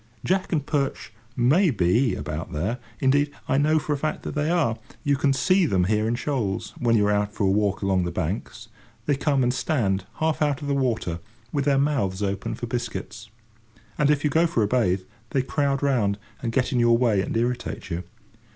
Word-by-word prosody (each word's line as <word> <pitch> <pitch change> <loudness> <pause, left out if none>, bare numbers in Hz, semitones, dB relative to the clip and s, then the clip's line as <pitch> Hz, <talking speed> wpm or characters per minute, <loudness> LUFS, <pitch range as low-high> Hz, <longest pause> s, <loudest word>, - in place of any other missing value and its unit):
Jack 190 +1 0
and 150 -5 0
perch 140 -6 -2 0.2
may 150 +10 +4
be 105 - +2
about 80 0 -5
there. 95 +12 -2 0.2
Indeed, 145 +2 +3 0.2
I 135 - +2
know 155 +2 +3
for 155 -1 -1
a - - -1
fact 155 +2 -2
that - - -4
they 150 +1 0
are. 155 -10 +1 0.2
You 145 -1 +2
can 140 +1 +2
see 170 +8 +3
them 95 -7 +2
there 105 +3 +1
in 115 - +1
shoals, 120 -7 -2
when 115 -2 +3
you 105 - +3
are 105 - +2
out 105 +1 0
for - - -1
a 95 - +3
walk 105 0 +1
along 95 -2 +2
the 85 - -2
banks: 95 +6 -4 0.4
they 145 - +2
come 140 -1 +1
and 125 0 +2
stand 105 - 0
half 160 -1 0
out 145 -3 +1
of - - -4
the 140 - +1
water 115 -11 -1 0.3
with 140 -2 0
their 140 -2 +3
mouths 125 -10 0
open 100 0 -2
for - - -5
biscuits. 115 -1 -5 0.7
And, 150 -1 +2
if 145 -1 +2
you 150 - +1
go 165 +4 +4
for 120 -9 +1
a - - +1
bathe, 100 -6 +1 0.4
they 130 - +3
crowd 140 0 0
round, 115 -8 +2 0.2
and 115 - -2
get 125 +2 +1
in 125 - +1
your 120 0 +5
way, 115 -5 +2
and 105 - -2
irritate 120 -4 -2
you. 85 +2 -2
125 Hz, 215 wpm, -24 LUFS, 105-145 Hz, 0.7 s, your